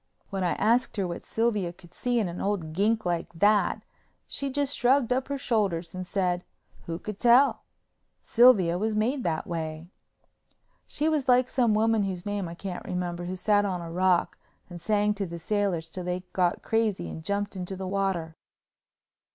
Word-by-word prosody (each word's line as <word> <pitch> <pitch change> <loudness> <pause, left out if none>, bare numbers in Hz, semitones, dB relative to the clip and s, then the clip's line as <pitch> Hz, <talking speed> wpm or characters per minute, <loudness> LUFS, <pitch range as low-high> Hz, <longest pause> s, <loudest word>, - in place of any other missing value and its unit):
When 195 -1 -2
I 175 - +1
asked 235 +1 +1
her 195 -2 0
what 170 - -6
Sylvia 210 -6 0
could 175 -1 -18
see 245 +4 -1
in 215 -5 +1
an 175 0 -5
old 185 -6 -2
gink 220 +4 +1
like 175 -1 -1
that, 205 +4 +3 0.4
she 280 - -4
just 285 +1 0
shrugged 250 0 +3
up 260 +1 -1
her 280 0 -2
shoulders 195 -10 -1
and 185 0 -6
said, 180 -2 0 0.4
who 165 0 -3
could 210 +3 -7
tell—Sylvia 240 -5 +3
was 215 +1 0
made 245 +5 0
that 160 -2 -1
way. 160 0 -5 1.0
She 300 - -1
was 300 -4 0
like 250 0 +5
some 240 -5 +2
woman 225 0 +3
whose 190 -2 -3
name 205 -3 -2
I 170 - -8
can't 180 0 -6
remember 175 -1 -3
who 185 +1 -4
sat 205 +2 +2
on 190 -3 -1
a 170 -1 -7
rock 180 0 +1 0.3
and 175 -1 -8
sang 210 +2 +2
to 200 -2 -3
the 170 0 -6
sailors 175 -3 -1
till 185 - -6
they 180 0 -3
got 180 -2 +1
crazy 225 -3 0
and 160 - -7
jumped 200 +3 -2
into 185 +1 -5
the 190 0 -5
water. 185 -4 -1
195 Hz, 180 wpm, -27 LUFS, 175-225 Hz, 1.0 s, like